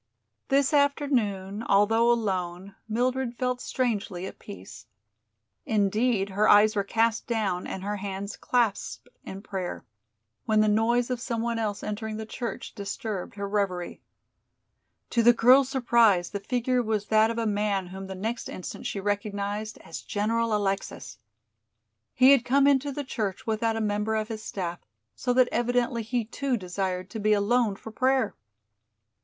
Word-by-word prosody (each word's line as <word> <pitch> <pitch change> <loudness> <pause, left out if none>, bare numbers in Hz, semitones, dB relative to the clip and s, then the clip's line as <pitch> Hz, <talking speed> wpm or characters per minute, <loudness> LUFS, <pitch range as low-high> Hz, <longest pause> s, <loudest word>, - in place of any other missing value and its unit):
This 275 +1 +2
afternoon, 240 -9 +1
although 225 +4 +4
alone, 190 -4 -2 0.2
Mildred 245 +1 -1
felt 250 -1 -1
strangely 210 -7 -2
at - - -9
peace. 100 +5 -11 0.8
Indeed, 210 0 +1
her 205 +2 +2
eyes 210 +1 +6
were 200 - +1
cast 225 +2 0
down 205 -6 -1
and 190 - -5
her 205 +1 -2
hands 200 +1 -5
clasped 235 -5 -1 0.2
in 195 +1 -8
prayer, 185 -4 -5 0.6
when 215 -1 +3
the 215 - +4
noise 235 +4 +2
of 245 -1 -2
some 235 -3 -2
one 235 -1 -1
else 210 -2 -2
entering 215 +1 -4
the 220 - -5
church 230 +1 -6
disturbed 200 -2 -5
her 200 0 -4
reverie. 195 -4 -2 1.1
To 235 - +3
the 240 +1 +7
girl's 255 +3 +5
surprise 235 -8 +3
the 200 - -3
figure 245 +4 0
was 215 -3 -1
that 220 +1 +4
of 230 - -3
a 230 - 0
man 205 -2 0
whom 190 +2 -8
the 190 - -6
next 225 +5 -4
instant 185 - -6
she 200 - -3
recognized 205 +1 -3
as 165 - -7
General 225 +2 0
Alexis. 195 -1 -3 1.0
He 260 +2 +7
had 275 -4 +5
come 275 +3 +3
into 280 0 +3
the 285 +1 -4
church 215 -7 -3
without 225 0 0
a 225 - -2
member 210 +1 0
of 215 0 -2
his 220 -1 -5
staff, 175 -5 -4 0.4
so 245 - -1
that 255 0 +5
evidently 240 0 0
he 230 +1 -2
too 260 +2 -2
desired 185 -1 -3
to 225 - -5
be 215 0 +3
alone 210 +1 +2
for 220 - -10
prayer. 255 -1 +1
215 Hz, 160 wpm, -27 LUFS, 200-240 Hz, 1.1 s, the